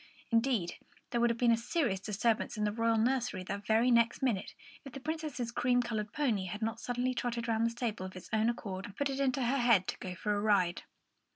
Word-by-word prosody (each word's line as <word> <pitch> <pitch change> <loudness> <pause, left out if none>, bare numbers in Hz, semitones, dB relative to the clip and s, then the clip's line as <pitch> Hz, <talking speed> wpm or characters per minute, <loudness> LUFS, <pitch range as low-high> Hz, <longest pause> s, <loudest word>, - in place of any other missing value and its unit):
Indeed, 230 -6 +1 0.3
there 235 - +1
would 240 - +4
have 235 - 0
been 240 -1 +4
a - - +6
serious 230 - 0
disturbance 215 +3 0
in 210 - -1
the 210 - +1
royal 230 +1 +1
nursery 240 -4 0
the 200 +2 -4
very 220 +4 +3
next 235 +2 +3
minute, 225 -8 0 0.3
if 275 - -10
the 275 - -6
Princess's 300 -5 -3
cream 245 +1 +2
coloured 215 -3 -3
pony 235 -10 0
had 210 +5 -5
not 225 +1 -2
suddenly 245 +1 -1
trotted 240 -1 -2
round 225 -1 +1
from 230 - +3
the - - +3
stable 230 -5 -3
of 185 - -12
its 185 - -10
own 220 +1 +3
accord, 195 -5 -4
and 200 - -12
put 285 -1 0
it 270 - -3
into 270 -1 +1
her 260 +3 +1
head 230 -6 +4
to - - -4
go 185 -1 -5
for 210 +4 -1
a 205 - -1
ride. 195 -5 +2
230 Hz, 240 wpm, -32 LUFS, 210-245 Hz, 0.3 s, a